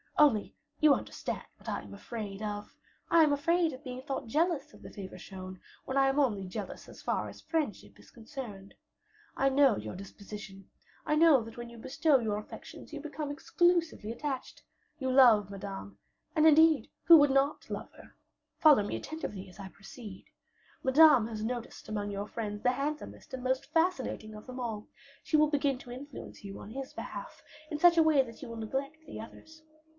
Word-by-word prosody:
Only 285 -9 +4 0.2
you 305 -2 +7
understand - - -4
what - - -9
I - - -2
am - - -12
afraid 210 -3 -6
of 205 -1 -5 0.3
I 335 -1 +7
am 300 -2 +4
afraid 335 +3 +2
of 260 +3 -10
being 255 -1 -6
thought 275 -1 -3
jealous 305 +2 0
of - - -16
the - - -9
favor 195 -3 -8
shown, 185 -1 -9 0.3
when 265 - -3
I 270 0 +5
am 270 +2 +1
only 210 -9 +1
jealous 185 - -6
as - - -12
far - - -1
as - - -11
friendship 310 - -3
is - - -18
concerned. 225 -5 -9 0.6
I 275 - +3
know 270 -4 +4
your - - -6
disposition; 195 0 -10 0.4
I 300 - +2
know 305 -6 +6
that 225 +1 -11
when 240 0 -6
you 235 - -12
bestow 275 +4 +2
your 215 -3 -1
affections 215 +8 -10
you 300 - -4
become 295 0 -5
exclusively 335 -6 +1
attached. 265 +2 -5 0.4
You 260 -2 -1
love 235 -7 +6
Madame 100 - -7 0.4
and 310 -1 +4
who, - - +10
indeed, 315 0 +5 0.2
would 290 -4 +9
not 275 +2 +1
love - - -5
her? - - -16 0.4
Follow 300 -9 +6
me 205 - -3
attentively 205 -12 -6
as 180 - -17
I 195 -1 -7
proceed: 195 +1 -11 0.6
Madame 265 -4 +7
has 215 -2 -5
noticed 240 0 -5
among 205 -1 -2
your 200 +1 -4
friends 210 -2 -4
the 250 - +4
handsomest 290 +3 -4
and 255 -1 -5
most 260 +2 -1
fascinating 325 -10 0
of 210 - -10
them 255 0 -8
all; 220 -4 -4 0.4
she 310 - +2
will 305 0 +5
begin 280 -2 +1
to 245 - -11
influence 270 -1 -9
you 195 -1 -7
on 210 - -9
his 270 +2 -6
behalf - - -7 0.3
in 300 - -2
such 345 +1 +6
a 325 - +7
way 310 -3 +5
that 230 -3 -12
you - - -7
will 230 - -7
neglect 270 +7 -3
the - - -8
others. 315 +8 -12
260 Hz, 190 wpm, -31 LUFS, 210-300 Hz, 0.6 s, who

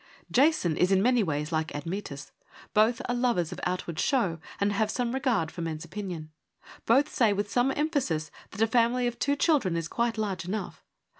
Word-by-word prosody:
Jason 265 - +3
is 180 +2 +3
in 190 - +5
many 245 +3 +3
ways 150 -4 -2
like 160 -1 -1
Admetus. 150 -2 -5 0.4
Both 225 +5 +3
are 245 - 0
lovers 240 -9 +1
of - - -6
outward 180 -3 -3
show 195 -12 +1 0.2
and 200 0 +1
have 215 +1 +1
a 250 - +1
great 240 0 -2
regard 235 - 0
for 175 - -7
men's 160 -2 -4
opinion. 180 -7 -6 0.6
Both 275 +6 +3
say 225 -4 +3
with 205 0 -2
some 250 +2 +2
emphasis 275 - -1 0.2
that 205 +3 -1
a - - +6
family 235 +2 +2
of 240 -1 -2
two 285 +1 +1
children 280 - +2
is 165 -1 -2
quite 235 +3 -1
large 195 -5 -2
enough. 195 +3 -5
210 Hz, 195 wpm, -28 LUFS, 170-245 Hz, 0.6 s, a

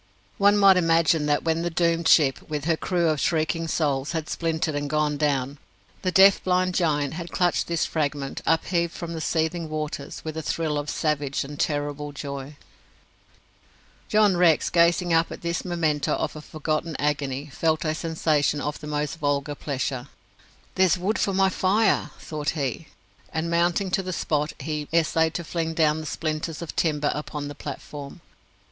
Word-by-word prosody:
One 205 +1 +5
might 195 -2 +7
imagine 165 -3 +3
that, 145 0 +1
when 165 0 +1
the 175 - -1
doomed 170 0 +1
ship, 140 -3 +4
with 150 -2 -3
her 165 -1 +2
crew 170 0 0
of 155 -2 0
shrieking 165 0 0
souls, 145 -2 0
had 160 -2 -3
splintered 160 -2 -1
and 145 0 -2
gone 150 0 +1
down, 140 -2 -1 0.4
the 185 - 0
deaf, 195 +1 +6
blind 185 0 +1
giant 150 -6 +1
had 170 +1 -6
clutched 175 -1 +1
this 170 -2 0
fragment, 145 -3 -2
upheaved 170 +2 +1
from 170 -1 -6
the 160 - -4
seething 160 +1 -1
waters, 150 -2 -5
with 155 -1 -4
a 160 - -3
thrill 150 +1 -1
of 145 0 -5
savage 145 -3 -1
and 145 +1 -9
terrible 145 0 -2
joy. 140 0 -6 1.5
John 210 -3 +4
Rex, 170 -3 +4
gazing 170 +1 +3
up 165 0 +3
at - - -8
this 170 0 -2
memento 160 -5 0
of - - -2
a 155 - -7
forgotten 155 +1 -3
agony, 145 -1 -2
felt 160 0 0
a 155 - +1
sensation 155 -3 0
of 150 0 -3
the 150 - -8
most 150 +2 -2
vulgar 145 -1 0
pleasure. 135 -2 -3 0.7
"There's 185 -1 +3
wood 200 +4 -1
for 195 - 0
my 190 0 +4
fire!" 205 +4 +2
thought 150 -1 -4
he; 140 +2 -3 0.4
and 160 +1 -2
mounting 175 +3 +1
to 195 - +2
the 185 -1 -4
spot, 150 -2 -1
he 150 -2 -4
essayed 160 0 +2
to 175 - -2
fling 165 0 -3
down 155 -1 +3
the 155 - -6
splinters 155 +1 -3
of 165 - -7
timber 150 -3 +1
upon 150 -1 -5
the - - -6
platform. 145 +2 -8
160 Hz, 175 wpm, -25 LUFS, 145-170 Hz, 1.5 s, might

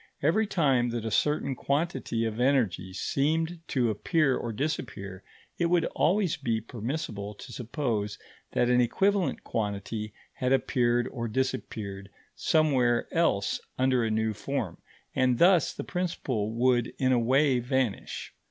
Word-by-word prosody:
Every 205 +9 +3
time 135 -10 +2
that 115 -1 -3
a 110 - -2
certain 150 0 +1
quantity 140 -5 -1
of 110 0 -3
energy 120 -9 +1
seemed 160 - 0
to 120 -4 +1
appear 140 - +2
or 120 - -3
disappear, 105 -7 -4 0.4
it 170 - +3
would 170 -1 +3
always 185 -1 +2
be 115 -2 -1
permissible 110 -2 -5
to 125 - -10
suppose 115 -5 -2 0.4
that 120 - +2
an 125 0 +4
equivalent 195 - +1
quantity 105 0 -3 0.2
had 130 +1 0
appeared 120 -2 +2
or 115 -1 -4
disappeared 110 -5 -3 0.3
somewhere 130 -7 +2
else 165 -12 +1 0.2
under 130 -2 +2
a 110 - 0
new 110 0 0
form; 110 - -3 0.3
and 130 -2 +2
thus 175 -1 +5
the - - -6
principle 135 - -2
would 120 0 +1
in 130 -1 +2
a 125 - +4
way 130 +2 +3
vanish. 125 -3 -2
125 Hz, 140 wpm, -28 LUFS, 110-145 Hz, 0.4 s, thus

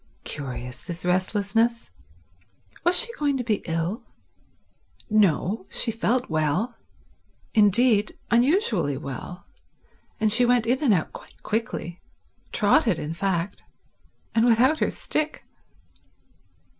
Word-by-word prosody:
Curious, 125 -3 -6
this 170 0 -6
restlessness. 205 - 0 0.9
Was 350 +1 +4
she 475 -1 +1
going 285 -2 +1
to 250 - -2
be 220 -4 -1
ill? 165 +8 -2 1.1
No, 200 0 +2
she 230 - +1
felt 240 +3 0
well; 160 - -1 0.8
indeed, 215 +1 +4
unusually 235 - +2
well, 145 +5 -8 0.7
and 215 -1 +2
she 245 - +4
went 245 -1 +3
in 255 +5 0
and 260 - +4
out 180 -6 0
quite - - -14
quickly—trotted, 210 -5 -1
in 150 +2 -4
fact—and 195 +4 -4
without 245 +6 +4
her - - +1
stick. 310 0 -3
215 Hz, 105 wpm, -24 LUFS, 175-240 Hz, 1.1 s, Was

